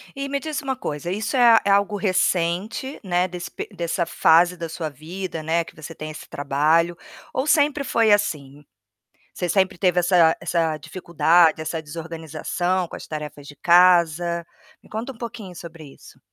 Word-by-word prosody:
E 275 Hz, 0 st, -4 dB
me 280 Hz, 0 st, -1 dB
diz 310 Hz, 0 st, -4 dB
uma 270 Hz, -2 st, -2 dB
coisa, 170 Hz, -, -5 dB
isso 220 Hz, +6 st, -2 dB
é 235 Hz, -2 st, +7 dB
é -, -, +1 dB
algo 200 Hz, +1 st, +2 dB
recente, 190 Hz, -, -1 dB
né, 180 Hz, -1 st, +1 dB
desse 175 Hz, 0 st, -7 dB
pe -, -, -6 dB
dessa 170 Hz, 0 st, -1 dB
fase 175 Hz, +2 st, +4 dB
da 165 Hz, -1 st, -5 dB
sua 160 Hz, -1 st, -4 dB
vida, 165 Hz, +4 st, -6 dB
né, 165 Hz, +2 st, +1 dB
que -, -, -15 dB
você 155 Hz, +1 st, -9 dB
tem 155 Hz, 0 st, -7 dB
esse 155 Hz, -, -10 dB
trabalho 155 Hz, +5 st, +1 dB, 0.4 s
ou 260 Hz, -, -1 dB
sempre 295 Hz, -1 st, +3 dB
foi 230 Hz, -5 st, +2 dB
assim? 145 Hz, -8 st, 0 dB, 0.7 s
Você 180 Hz, -, -3 dB
sempre 190 Hz, 0 st, +1 dB
teve 180 Hz, -1 st, +2 dB
essa 175 Hz, -2 st, +4 dB
essa 165 Hz, -3 st, 0 dB
dificuldade, 170 Hz, 0 st, +2 dB
essa 160 Hz, +1 st, -3 dB
desorganização 165 Hz, +3 st, -3 dB
com -, -, -9 dB
as -, -, -10 dB
tarefas 150 Hz, -2 st, -7 dB
de 145 Hz, -, -11 dB
casa? 170 Hz, 0 st, +4 dB, 0.4 s
Me -, -, -20 dB
conta 225 Hz, +5 st, -5 dB
um -, -, -19 dB
pouquinho 225 Hz, -6 st, -8 dB
sobre 165 Hz, -2 st, -10 dB
isso. -, -, -17 dB
175 Hz, 175 wpm, -22 LUFS, 160-200 Hz, 0.7 s, é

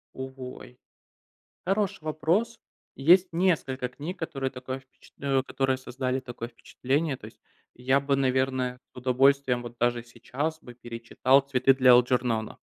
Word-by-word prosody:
О 130 Hz, 0 st, -6 dB
ой. 125 Hz, -1 st, -9 dB, 0.9 s
Хороший 195 Hz, -3 st, 0 dB
вопрос. 170 Hz, +10 st, 0 dB, 0.4 s
И 135 Hz, -, -9 dB
есть 180 Hz, +5 st, +6 dB
несколько 155 Hz, -8 st, 0 dB
книг, 155 Hz, +9 st, -7 dB
которые 135 Hz, -5 st, -3 dB
такое 130 Hz, 0 st, -6 dB
впечат 130 Hz, 0 st, -23 dB
э, 135 Hz, -2 st, +1 dB
которые 135 Hz, -1 st, 0 dB
создали 130 Hz, 0 st, -3 dB
такое 120 Hz, -2 st, -7 dB
впечатление. 135 Hz, +5 st, -2 dB
То -, -, -12 dB
есть -, -, -13 dB, 0.4 s
я 130 Hz, +3 st, +2 dB
бы, 140 Hz, 0 st, 0 dB
наверное, 130 Hz, -1 st, 0 dB
с -, -, -56 dB
удовольствием 130 Hz, 0 st, +2 dB
вот 120 Hz, 0 st, -9 dB
даже 120 Hz, 0 st, +1 dB
сейчас 135 Hz, +7 st, -4 dB
бы 125 Hz, -, -12 dB
перечитал 120 Hz, +3 st, +1 dB
"Цветы 135 Hz, -1 st, +3 dB
для 130 Hz, -1 st, +6 dB
Элджернона". 120 Hz, -2 st, +2 dB
130 Hz, 145 wpm, -27 LUFS, 125-140 Hz, 0.9 s, есть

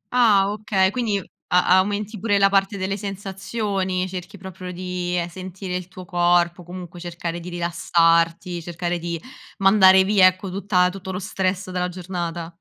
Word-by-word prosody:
Ah 205 Hz, -5 st, +5 dB
okay, 200 Hz, -3 st, +1 dB
quindi 215 Hz, -3 st, 0 dB, 0.3 s
a 180 Hz, +1 st, +4 dB
aumenti 205 Hz, +2 st, -2 dB
pure 205 Hz, 0 st, +1 dB
la 195 Hz, -, +5 dB
parte 195 Hz, +1 st, +1 dB
delle 195 Hz, +1 st, -2 dB
sensazioni, 195 Hz, -1 st, -3 dB
cerchi 185 Hz, +2 st, -7 dB
proprio 185 Hz, -1 st, -8 dB
di 180 Hz, 0 st, -3 dB
sentire 185 Hz, +1 st, -6 dB
il 180 Hz, -1 st, -4 dB
tuo 185 Hz, 0 st, -11 dB
corpo, 175 Hz, -1 st, +2 dB
comunque 175 Hz, 0 st, -9 dB
cercare 170 Hz, 0 st, -5 dB
di 175 Hz, +1 st, -8 dB
rilassarti, 170 Hz, 0 st, +1 dB
cercare 175 Hz, +1 st, -3 dB
di 170 Hz, 0 st, -4 dB, 0.4 s
mandare 190 Hz, -1 st, +6 dB
via 195 Hz, -1 st, +6 dB
ecco, 185 Hz, 0 st, -1 dB
tutta 185 Hz, -2 st, +2 dB
tutto 190 Hz, 0 st, -7 dB
lo 185 Hz, -, -3 dB
stress 190 Hz, -1 st, -2 dB
dalla 180 Hz, 0 st, -1 dB
giornata. 175 Hz, -2 st, -5 dB
185 Hz, 150 wpm, -22 LUFS, 175-195 Hz, 0.4 s, mandare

